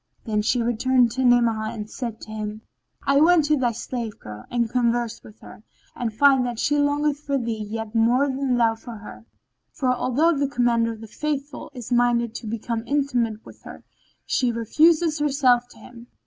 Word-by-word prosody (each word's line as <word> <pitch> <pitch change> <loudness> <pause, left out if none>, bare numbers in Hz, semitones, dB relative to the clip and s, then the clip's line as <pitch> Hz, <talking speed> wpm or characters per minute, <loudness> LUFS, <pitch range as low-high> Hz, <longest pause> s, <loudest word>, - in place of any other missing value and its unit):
Then 215 -2 0
she 235 +3 +1
returned 240 +1 +2
to 260 +2 -2
Ni'amah 235 -3 +3
and 210 -2 -6
said 230 -1 -6
to 215 - -10
him, 215 0 -5 0.4
"I 275 +1 +4
went 330 -1 +5
to 305 +1 +3
thy 250 -4 +1
slave 230 -1 -5
girl 105 0 -10
and 235 -1 0
conversed 235 -1 -1
with 215 - -16
her, - - -13 0.3
and 240 - -2
I 215 - -15
find 270 +1 +5
that 240 -2 -3
she 290 +5 +1
longeth 290 0 +1
for 280 -2 -2
thee 230 -4 -3
yet 225 0 -5
more 235 +4 +3
than 265 -2 -1
thou 230 -2 +3
for 230 +1 -10
her; 215 +1 -12 0.4
for 255 -3 0
although 270 +7 +1
the 280 0 0
Commander 240 -3 +1
of 220 - -12
the 225 - -9
Faithful 290 +3 -4
is 245 -1 -8
minded 240 -1 +2
to 235 - -7
become 230 +1 -3
intimate 245 -6 -1
with - - -14
her, - - -11 0.4
she 250 -2 +1
refuseth 310 +7 +2
herself 265 -4 +2
to - - -18
him. 240 -1 -14
240 Hz, 190 wpm, -23 LUFS, 225-275 Hz, 0.4 s, went